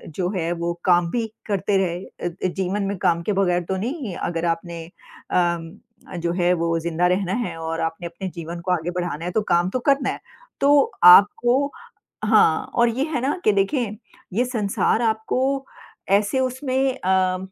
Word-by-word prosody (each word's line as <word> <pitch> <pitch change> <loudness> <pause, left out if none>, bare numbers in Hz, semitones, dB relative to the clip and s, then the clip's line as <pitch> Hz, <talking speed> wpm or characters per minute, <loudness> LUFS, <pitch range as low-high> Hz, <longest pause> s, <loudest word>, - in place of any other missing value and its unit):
जो 180 -1 -1
है 170 -1 -1
वो 170 0 -2
काम 175 -2 +4
भी 235 -2 -1 0.2
करते 200 -1 0
रहे 180 -2 0
अ - - -6
अ, 175 +2 -3
जीवन 190 +2 -2
में 200 0 -2
काम 170 -2 +1
के 210 - -1
बगैर 180 -2 +1
तो 190 - 0
नहीं 235 - -4
अगर 170 -1 -3
आपने 170 0 -3 0.5
अम, 170 -2 0 0.4
जो 170 0 -1
है 175 0 +2
वो 165 -1 0
जिंदा 170 +1 0
रहना 185 +1 0
है - - -6
और 165 0 -4
आपने 165 +1 -3
अम, 170 - -11
अपने 190 - -5
जीवन 170 +1 -6
को 180 - -2
आगे 175 -1 0
बढ़ाना 175 -2 -4
है 180 - -2
तो 220 - +1
काम 175 +1 +3
तो 255 - -2
करना 275 0 +2
है। - - -4 0.4
तो 285 0 +4
आपको 240 +9 +6 0.5
हाँ 210 -7 +4
और 235 0 +4
ये 245 +4 -1
है 305 - -1
ना 280 +7 0
कि - - +4
देखें 210 +2 0 0.4
ये 240 +6 +1
संसार 220 -2 0
आपको 255 +5 0 0.5
ऐसे 205 +5 +2
उसमें 260 0 -1
अ, 185 0 +1
185 Hz, 185 wpm, -22 LUFS, 175-230 Hz, 0.5 s, आपको